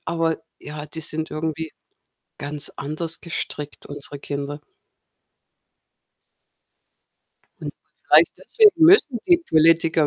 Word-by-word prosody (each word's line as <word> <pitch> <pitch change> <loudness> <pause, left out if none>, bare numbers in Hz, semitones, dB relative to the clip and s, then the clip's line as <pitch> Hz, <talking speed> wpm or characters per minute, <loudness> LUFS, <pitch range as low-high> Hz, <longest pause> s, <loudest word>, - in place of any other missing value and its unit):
Aber 165 -1 -1 0.2
ja, 150 0 -8
die 160 - -7
sind 160 0 -2
irgendwie 160 0 -4 0.7
ganz 145 0 -4
anders 155 +3 -4
gestrickt, 150 -3 -5
unsere 145 0 -8
Kinder. 145 +1 -6 3.0
Und - - -6 0.3
vielleicht - - +5
deswegen 415 -8 +4
müssen 320 - +5
die 350 -2 +5
Politiker 165 - +3
160 Hz, 95 wpm, -22 LUFS, 150-170 Hz, 3.0 s, vielleicht